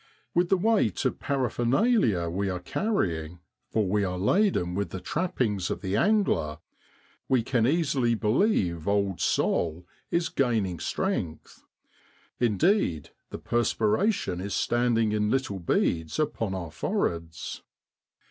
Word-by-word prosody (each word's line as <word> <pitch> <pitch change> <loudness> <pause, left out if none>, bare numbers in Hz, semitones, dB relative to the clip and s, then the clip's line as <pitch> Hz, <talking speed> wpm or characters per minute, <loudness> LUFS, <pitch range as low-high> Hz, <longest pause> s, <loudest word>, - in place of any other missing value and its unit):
With 175 0 +2
the 195 - +4
weight 205 - +1
of - - 0
parapher 130 -4 -1
nalia 120 - +2
we 95 +4 -1
are 90 - -2
carrying, 90 - -2 0.3
for 110 -3 0
we 105 +2 +1
are 90 -1 -2
laden 105 - +2
with 100 +2 -2
the 95 - -5
trappings 115 - -1
of - - -3
the 95 0 -2
angler, 185 - +2 0.7
we 130 -3 +3
can 120 -1 +1
easily 135 -6 +2
believe 105 - +1
old 100 -3 0
Sol 85 +1 0 0.2
is 170 0 +1
gaining 110 - 0
strength; 80 -2 -3 0.8
indeed, 110 - +1 0.2
the - - -6
perspiration 115 - 0
is 100 +1 -3
standing 120 -2 +1
in 105 0 +1
little 130 -6 -1
beads 80 -1 0
upon 115 -10 -1
our 85 -4 -5
foreheads. 85 -1 -3
105 Hz, 130 wpm, -27 LUFS, 90-135 Hz, 0.8 s, the